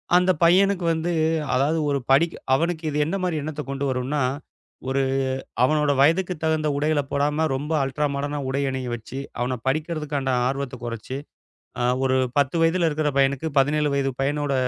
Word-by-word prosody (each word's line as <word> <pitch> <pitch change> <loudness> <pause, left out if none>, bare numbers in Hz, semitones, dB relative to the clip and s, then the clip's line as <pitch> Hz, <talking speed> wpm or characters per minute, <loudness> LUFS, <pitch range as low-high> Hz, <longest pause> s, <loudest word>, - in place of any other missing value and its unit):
அந்தப் 180 -2 +3
பையனுக்கு 185 +2 +4
வந்து, 165 +2 -2 0.4
அதாவது 150 +5 +2
ஒரு 140 -1 +1
படிக் 165 +5 +4 0.2
அவனுக்கு 165 +3 0
இது 145 - -3
என்ன 165 - -2
மாரி 165 -4 0
எண்ணத்த 150 0 -4
கொண்டு 140 +1 -2
வரும்னா, 130 +3 -1 0.7
ஒரு 135 +1 +1 0.6
அவனோட 150 +2 +3
வயதுக்குத் 170 +2 +2
தகுந்த 155 -1 +1
உடைகள 150 0 +1
போடாம, 150 +3 +1
ரொம்ப 150 +4 -4
அல்ட்ரா 135 +3 -1
மாடர்ன்னா 145 +1 -2
உடை 140 +2 -1
அணிய 130 -2 -4
வச்சு, 120 +3 -7 0.2
அவன 125 0 -1
படிக்கறதுக்காண்ட 150 -2 -1 0.2
ஆர்வத்தை 135 -2 -3
கொறைச்சு, 115 +3 -5 0.6
அ - - 0 0.2
ஒரு 130 0 +2 0.2
10 140 +3 +2
வயதுல 165 +1 +3
இருக்குற 150 0 0
பையனுக்கு 140 +3 +2
17 150 +2 +3
வயது 135 -1 0
பையனோட 145 0 0
145 Hz, 155 wpm, -24 LUFS, 135-160 Hz, 0.7 s, பையனுக்கு